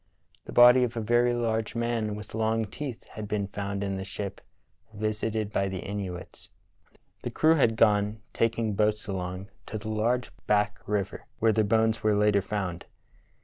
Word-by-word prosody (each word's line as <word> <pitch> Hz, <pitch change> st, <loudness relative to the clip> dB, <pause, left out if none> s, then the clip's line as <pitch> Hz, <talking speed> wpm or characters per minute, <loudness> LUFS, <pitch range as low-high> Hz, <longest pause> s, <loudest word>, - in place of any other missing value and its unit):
The -, -, -8 dB
body 125 Hz, +1 st, +8 dB
of 120 Hz, -1 st, -2 dB
a -, -, +1 dB
very 120 Hz, +2 st, +3 dB
large 115 Hz, -1 st, -1 dB
man 115 Hz, -2 st, -1 dB
with 105 Hz, 0 st, -9 dB
long 110 Hz, 0 st, +1 dB
teeth 125 Hz, +3 st, -7 dB
had 110 Hz, -1 st, -7 dB
been 105 Hz, -1 st, -1 dB
found 100 Hz, 0 st, -3 dB
in 100 Hz, -1 st, -2 dB
the 95 Hz, -, -4 dB
ship 100 Hz, 0 st, -6 dB, 0.5 s
visited 110 Hz, 0 st, -2 dB
by 95 Hz, -, +1 dB
the 95 Hz, -, -4 dB
Inuits. 95 Hz, -3 st, -6 dB, 0.7 s
The -, -, -3 dB
crew 160 Hz, +1 st, +4 dB
had 120 Hz, -8 st, +3 dB
gone, 105 Hz, -1 st, +3 dB
taking 115 Hz, -1 st, +1 dB
boats 105 Hz, +1 st, +1 dB
along, 95 Hz, 0 st, -4 dB, 0.2 s
to 110 Hz, -, -4 dB
the 110 Hz, +1 st, -6 dB
"large 115 Hz, +4 st, 0 dB, 0.2 s
[Back] 105 Hz, 0 st, +2 dB
river," 100 Hz, -1 st, -2 dB
where 110 Hz, 0 st, +3 dB
their 110 Hz, 0 st, +3 dB
bones 110 Hz, +1 st, +2 dB
were 110 Hz, -1 st, +3 dB
later 105 Hz, -1 st, +3 dB
found. 95 Hz, -3 st, -4 dB
105 Hz, 170 wpm, -28 LUFS, 100-115 Hz, 0.7 s, body